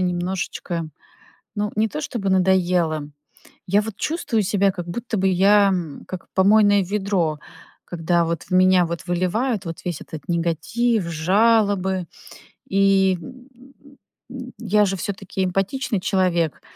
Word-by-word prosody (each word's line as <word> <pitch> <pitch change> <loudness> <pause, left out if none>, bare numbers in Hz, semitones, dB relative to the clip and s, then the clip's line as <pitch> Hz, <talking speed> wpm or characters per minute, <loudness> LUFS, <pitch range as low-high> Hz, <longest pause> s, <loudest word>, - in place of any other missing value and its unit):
немножечко, 175 -2 -3 0.7
ну, 210 0 -1
не 220 +1 +2
то 150 -6 -5
чтобы 195 +4 -3
надоело. 180 -5 +2 0.6
Я 200 +3 +3
вот 220 -1 -6
чувствую 290 -9 -1
себя, 195 0 +2
как 175 -2 -7
будто 225 +4 -4
бы 190 - +2
я, 200 +2 +5
м, 175 -6 -4
как 185 -2 -7
помойное 205 +1 +4
ведро, 190 -5 -1 0.5
когда 170 0 0
вот 165 -1 -3
в 180 - -22
меня 185 -1 +5
вот 170 +2 -5
выливают 190 +5 -1
вот 165 -1 -5
весь 175 -4 -3
этот 160 +1 -10
негатив, 175 +7 0
жалобы. 190 +2 +2 0.6
И, 195 -1 +3
м 255 +5 -12 0.8
м, 255 -1 -8
я 210 -2 +2
же 195 0 -1
всё-таки 195 0 -4
эмпатичный 195 +4 -1
человек. 180 -4 0
190 Hz, 130 wpm, -22 LUFS, 175-210 Hz, 0.8 s, я